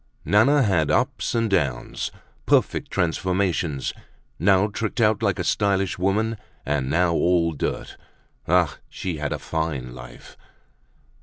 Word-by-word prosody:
Nana 135 Hz, +8 st, +4 dB
had 85 Hz, -8 st, +2 dB
ups -, -, 0 dB
and 115 Hz, -1 st, +2 dB
downs, 75 Hz, -, -1 dB, 0.4 s
perfect -, -, +2 dB
transformations, 90 Hz, -4 st, -1 dB, 0.5 s
now 95 Hz, +3 st, +4 dB
tricked 110 Hz, +3 st, -4 dB
out 110 Hz, -1 st, +3 dB
like 100 Hz, -3 st, +1 dB
a 90 Hz, -, -2 dB
stylish 95 Hz, -1 st, 0 dB
woman 105 Hz, +4 st, +1 dB, 0.3 s
and 70 Hz, -3 st, -1 dB
now 85 Hz, +2 st, +2 dB
all 85 Hz, -1 st, +2 dB
dirt. 75 Hz, -, -4 dB, 0.5 s
Ah! 85 Hz, -3 st, +2 dB
she 90 Hz, -4 st, -4 dB
had 75 Hz, -1 st, -3 dB
a -, -, -1 dB
fine 75 Hz, -7 st, -3 dB
life. -, -, -12 dB
90 Hz, 130 wpm, -23 LUFS, 80-100 Hz, 0.5 s, Nana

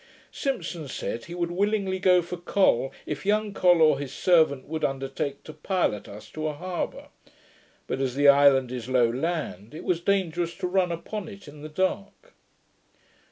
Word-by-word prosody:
Simpson 215 Hz, -, -3 dB
said, 115 Hz, -2 st, -4 dB
he 170 Hz, -, -8 dB
would 170 Hz, -1 st, -2 dB
willingly 195 Hz, 0 st, 0 dB
go 180 Hz, -2 st, +4 dB
for 175 Hz, +1 st, -5 dB
Col, 170 Hz, -, +2 dB
if 150 Hz, -1 st, -5 dB
young 210 Hz, +1 st, +1 dB
Col 175 Hz, -4 st, +4 dB
or 155 Hz, -3 st, +4 dB
his 140 Hz, -3 st, -5 dB
servant 160 Hz, -7 st, +3 dB
would 160 Hz, +1 st, -4 dB
undertake 135 Hz, +1 st, -2 dB
to 155 Hz, -, -10 dB
pilot 155 Hz, -, -1 dB
us 105 Hz, +1 st, -11 dB
to 155 Hz, 0 st, -3 dB
a 155 Hz, -, -2 dB
harbour; 180 Hz, +4 st, -5 dB, 0.8 s
but, -, -, -3 dB
as 130 Hz, -2 st, -1 dB
the 145 Hz, +1 st, +4 dB
island 140 Hz, -3 st, +6 dB
is 125 Hz, -1 st, -5 dB
low 125 Hz, -2 st, +4 dB
land, 130 Hz, -, -3 dB
it -, -, -7 dB
was 175 Hz, -2 st, 0 dB
dangerous 175 Hz, -3 st, 0 dB
to -, -, -4 dB
run 180 Hz, -1 st, +1 dB
upon 180 Hz, +5 st, -5 dB
it 200 Hz, -5 st, -12 dB
in 145 Hz, 0 st, -12 dB
the 155 Hz, -, -7 dB
dark. 195 Hz, -, -3 dB
165 Hz, 175 wpm, -26 LUFS, 140-185 Hz, 0.8 s, island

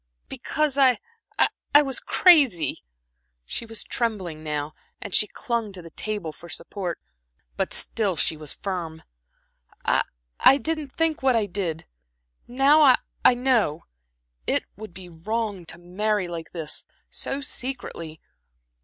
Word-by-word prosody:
"Because 300 Hz, -2 st, -1 dB
I 260 Hz, -2 st, +6 dB, 0.8 s
was 270 Hz, -3 st, +1 dB
crazy." 280 Hz, -, +4 dB, 0.6 s
She 230 Hz, -, -4 dB
was 225 Hz, -1 st, 0 dB
trembling 190 Hz, -10 st, -2 dB
now, 150 Hz, -1 st, -3 dB, 0.3 s
and 200 Hz, -, -8 dB
she 210 Hz, -, +5 dB
clung 235 Hz, -4 st, -3 dB
to 185 Hz, -, -6 dB
the 165 Hz, -, -12 dB
table 205 Hz, -7 st, -3 dB
for 170 Hz, +3 st, -14 dB
support; 175 Hz, 0 st, -4 dB, 0.6 s
but -, -, -2 dB
still 205 Hz, -5 st, 0 dB
she 160 Hz, -, +3 dB
was 150 Hz, -2 st, -3 dB
firm. 170 Hz, -5 st, -5 dB, 0.8 s
"I -, -, +3 dB, 0.4 s
I 270 Hz, -, +7 dB
didn't 310 Hz, -2 st, -4 dB
think 325 Hz, -1 st, 0 dB
what 260 Hz, -2 st, +3 dB
I 220 Hz, -2 st, +2 dB
did. 175 Hz, -5 st, -4 dB, 0.6 s
Now 275 Hz, +5 st, +4 dB
I 265 Hz, -4 st, +7 dB, 0.3 s
I 250 Hz, -, +7 dB
know. 240 Hz, -, +1 dB, 0.6 s
It -, -, +2 dB
would 210 Hz, -2 st, -10 dB
be 185 Hz, -1 st, -9 dB
wrong 200 Hz, +2 st, -3 dB
to 170 Hz, -, -9 dB
marry 190 Hz, +3 st, -1 dB
like 165 Hz, -2 st, -7 dB
this 160 Hz, -3 st, -1 dB, 0.3 s
so 275 Hz, -, -3 dB
secretly. 245 Hz, -, -6 dB
205 Hz, 135 wpm, -25 LUFS, 170-255 Hz, 0.8 s, I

